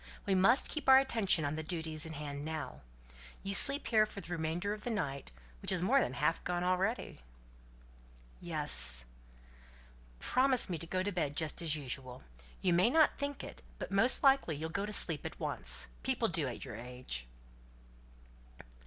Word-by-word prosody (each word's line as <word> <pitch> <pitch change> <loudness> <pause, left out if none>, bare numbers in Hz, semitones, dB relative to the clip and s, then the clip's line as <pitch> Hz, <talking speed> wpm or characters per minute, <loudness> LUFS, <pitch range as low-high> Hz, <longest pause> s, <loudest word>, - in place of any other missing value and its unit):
We 195 - 0
must 195 +8 +4
keep 300 -4 -3
our 265 - +9
attention 225 - +1
on 145 - -2
the 160 - -4
duties 160 -1 -5
in 160 - -8
hand 145 -1 -6
now. 155 -1 -6 0.6
You 195 - -3
sleep 275 +8 +7
here 215 -2 +2
for 205 - -10
the 175 -2 -10
remainder 170 +5 -3
of 210 - -9
the 245 - -5
night, 140 - -4 0.3
which - - -1
is 180 -2 0
more 265 +9 +3
than 125 - -2
half 150 +5 -1
gone 175 0 -3
already?" 185 - -2 1.2
"Yes." - - +3 1.1
"Promise 255 - +2
me 170 - -3
to 165 - -5
go 185 +2 -2
to 205 - -3
bed 155 -6 -3
just 160 0 0
as 160 -2 +3
usual. 130 -3 -5 0.4
You 180 - +2
may 180 +6 +3
not 315 +3 +2
think 285 0 -4
it, - - -10 0.2
but - - -7
most 210 +9 +3
likely 270 - +3
you'll 160 +3 -5
go 200 +4 -3
to - - -6
sleep 165 -7 0
at - - -8
once. - - 0
People - - -1
do - - -1
at - - -7
your - - -8
age." 125 - -6
175 Hz, 180 wpm, -32 LUFS, 145-210 Hz, 1.2 s, our